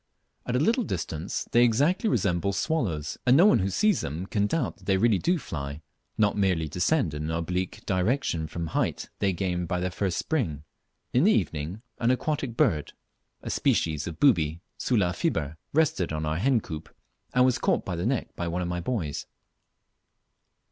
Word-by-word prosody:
At 125 - -1
a - - +3
little 230 - +2
distance 85 - -3
they 120 - +5
exactly 145 - +3
resemble 100 - +1
swallows, 95 - -1
and 125 +2 +7
no 175 - +7
one 210 - +6
who 95 0 0
sees 205 - +2
them 80 +6 -4
can 100 +1 0
doubt 145 0 -1
that 95 - -19
they 95 -1 +3
really 110 -1 +3
do 180 +1 +2
fly, 75 - -6 0.3
not 105 -2 +3
merely 90 -6 +1
descend 90 - +1
in 75 +1 -4
an - - -3
oblique 90 +3 -3
direction 95 - 0
from 85 +2 -4
the 80 - -7
height - - -1
they 100 -1 +2
gain 90 -1 -2
by 90 +2 -1
their 90 +1 -1
first 95 -1 -1
spring. 90 - -1 0.5
In 125 - +4
the 215 - +6
evening 85 - -1 0.2
an 115 - +2
aquatic 130 -2 -1
bird, 75 -3 +1 0.5
a - - -4
species 75 -1 +1
of 85 -2 -7
booby 85 - +3 0.2
(Sula 100 -8 +1
fiber.) 80 -2 -1
rested 150 - +1
on 80 0 -2
our 75 +1 -1
hen 120 +4 +2
coop, 80 -3 -7 0.5
and 125 0 +6
was 130 -1 +2
caught - - +1
by 90 - -3
the 85 +5 -1
neck 130 -2 -2
by 85 - -3
one 90 +2 -1
of - - -2
my 90 0 -2
boys. 85 - -3
95 Hz, 190 wpm, -27 LUFS, 80-125 Hz, 0.5 s, and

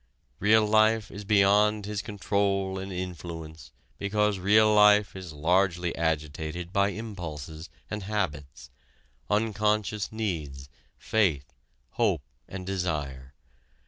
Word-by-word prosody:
Real 110 +2 +4
life 110 0 +3
is 100 +1 -8
beyond 105 +1 +3
his 105 0 -3
control 100 -2 -1
and 95 +1 -6
influence 85 -3 -7 0.3
because 105 0 0
real 105 +3 +5
life 105 -1 +5
is 95 -3 -8
largely 90 +3 +1
agitated 80 +2 -3
by 100 0 +3
impulses 85 -7 -7 0.2
and 105 0 -5
habits, 75 - -4 0.6
unconscious 105 -1 0
needs, 80 -11 -4 0.3
faith, 85 -11 0 0.4
hope 100 - +1 0.2
and 95 -1 -7
desire. 75 -9 -3
95 Hz, 105 wpm, -27 LUFS, 80-105 Hz, 0.6 s, real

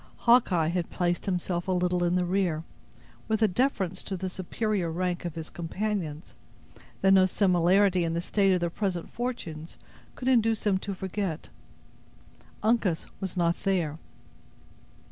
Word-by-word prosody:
Hawkeye 200 -10 +4
had 175 0 -2
placed 175 +1 -1
himself 175 -1 -1
a - - +1
little 180 -1 +1
in 175 0 +2
the 180 0 +1
rear, 175 -4 0 0.6
with 220 0 +1
a - - +6
deference 190 -4 0
to 190 - -3
the 185 +1 -3
superior 190 0 -2
rank 180 +1 -2
of 170 - -4
his 160 -1 -6
companions, 175 -2 -3 0.7
that 195 0 +5
no 190 -1 +6
similarity 185 0 +3
in 165 0 -1
the - - 0
state 195 +2 +2
of 180 -1 +2
their 170 -1 0
present 185 -3 -3
fortunes 170 -11 -5 0.4
could 255 - -5
induce 225 -4 +3
him 195 -3 +3
to 200 0 -4
forget. 190 -3 -4 1.1
Uncas 215 -7 +1
was 190 -2 -4
not 170 -1 +2
there. 170 -6 0
185 Hz, 150 wpm, -28 LUFS, 175-200 Hz, 1.1 s, a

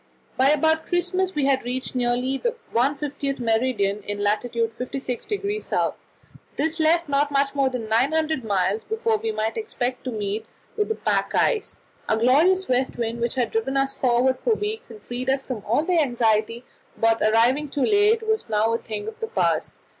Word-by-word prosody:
By 260 +2 +4
about 315 +2 +2
Christmas 365 +2 0
we 290 -2 +1
had 270 -1 +2
reached 250 +2 -3
nearly 250 +1 0
the 475 - -1 0.2
150th 280 +2 -1
meridian 225 -3 +1
in 205 0 -4
lat. 205 +1 +1
56° 230 -2 -2 0.9
S. - - +1 0.6
This 315 +3 -1
left 330 +2 +3
not 285 +1 +1
much 280 -1 +1
more 275 -2 +2
than 250 -4 -5
900 285 +5 +1
miles 200 0 0
before 445 0 0
we 445 +1 -2
might 220 - -2
expect 255 - -3
to 255 - -2
meet 215 0 -3 0.3
with 420 0 0
the 445 - 0
pack - - -1
ice. 440 -4 +1 0.3
Our 220 - +3
glorious 315 +11 +4
west 255 +1 0
wind, 235 0 -2
which 235 +1 -1
had 245 -2 0
driven 445 -12 -1
us 270 0 +1
forward 255 +1 +2
for 460 - +1
weeks, 430 +3 -3
and 430 - -11
freed 250 +2 -4
us 270 0 0
from 235 -6 -5
all 240 +9 +2
anxiety 240 -8 +1 0.3
about 225 0 +2
arriving 240 +7 +3
too 280 -1 0
late, 430 +2 +3
was 440 - 0
now 220 +1 +2
a 230 - 0
thing 215 -2 -6
of 445 +1 -7
the 450 - -3
past. 460 - -1
265 Hz, 180 wpm, -24 LUFS, 230-320 Hz, 0.9 s, By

